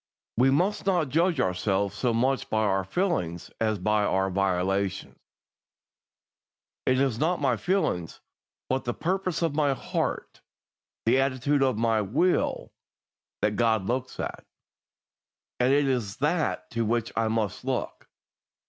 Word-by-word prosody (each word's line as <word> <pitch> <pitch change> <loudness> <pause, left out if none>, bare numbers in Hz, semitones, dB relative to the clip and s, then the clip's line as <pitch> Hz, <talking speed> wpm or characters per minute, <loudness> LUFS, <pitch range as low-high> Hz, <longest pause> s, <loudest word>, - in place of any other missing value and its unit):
We 125 +3 +4
must 180 +9 +1
not 175 -7 +2
judge 165 +5 +2
ourselves 95 +2 0
so 125 - 0
much 130 +4 0
by 110 0 +1
our 95 -2 +1
feelings 95 - -2
as 110 -1 +1
by 105 +3 +1
our 95 -1 +1
volitions. 95 0 -1 1.7
It 130 0 +3
is 130 -5 +1
not 175 +4 +1
my 135 -4 +2
feelings, 105 - -1 0.5
but 130 +1 -1
the 120 - -2
purpose 185 -1 -1
of 165 -3 +1
my 145 -2 +2
heart, - - -3 0.6
the 120 +4 +4
attitude 135 +2 +1
of 130 -5 +2
my 115 -1 +2
will, 155 - 0 0.7
that 105 0 +2
God 110 -4 +2
looks 125 +3 -3
at, - - -4 1.2
and 125 +1 +3
it 140 0 +3
is 120 -5 -1
that 145 - -1
to 115 0 0
which 115 +1 0
I 115 -1 +1
must 110 -3 -1
look. 130 -1 -3
120 Hz, 140 wpm, -27 LUFS, 105-145 Hz, 1.7 s, We